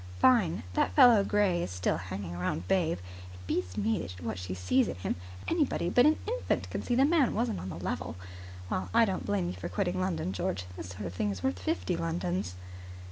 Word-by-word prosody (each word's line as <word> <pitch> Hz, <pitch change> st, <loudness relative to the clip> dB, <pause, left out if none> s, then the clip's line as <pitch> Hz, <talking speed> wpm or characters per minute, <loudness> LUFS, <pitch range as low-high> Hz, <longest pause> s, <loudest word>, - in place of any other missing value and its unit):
"Fine. 225 Hz, -10 st, +4 dB
That 90 Hz, -, +1 dB
fellow 225 Hz, -, +8 dB
Gray 200 Hz, -4 st, +2 dB
is -, -, -2 dB
still 90 Hz, 0 st, 0 dB
hanging 95 Hz, 0 st, -5 dB
round 90 Hz, 0 st, -2 dB
Babe. 170 Hz, -, +2 dB, 0.4 s
It 90 Hz, 0 st, -13 dB
beats 90 Hz, +1 st, -2 dB
me 110 Hz, +1 st, 0 dB
what 90 Hz, -, -4 dB
she 90 Hz, 0 st, -4 dB
sees 90 Hz, +9 st, +2 dB
in -, -, -3 dB
him. 90 Hz, +1 st, -2 dB, 0.3 s
Anybody 295 Hz, -, +1 dB
but 245 Hz, +7 st, +6 dB
an 310 Hz, -, +4 dB
infant -, -, -1 dB
could -, -, -3 dB
see 245 Hz, -, 0 dB
the 265 Hz, +2 st, +5 dB
man 305 Hz, -4 st, +3 dB
wasn't 230 Hz, 0 st, 0 dB
on 95 Hz, -, -5 dB
the -, -, -5 dB
level. -, -, -3 dB, 0.5 s
Well, 95 Hz, 0 st, -2 dB
I 230 Hz, -, +7 dB
don't 190 Hz, -, -3 dB
blame 100 Hz, -3 st, +1 dB
you 90 Hz, -, -2 dB
for 90 Hz, -, -6 dB
quitting 185 Hz, -2 st, -1 dB
London, 170 Hz, -, -1 dB
George. 95 Hz, -1 st, -2 dB
This 90 Hz, -, -7 dB
sort 95 Hz, +2 st, -7 dB
of 90 Hz, -, -5 dB
thing 105 Hz, +3 st, -1 dB
is 95 Hz, -2 st, -5 dB
worth 90 Hz, +1 st, 0 dB
fifty 90 Hz, -1 st, -1 dB
Londons." 90 Hz, +2 st, -2 dB
95 Hz, 210 wpm, -30 LUFS, -, 0.5 s, fellow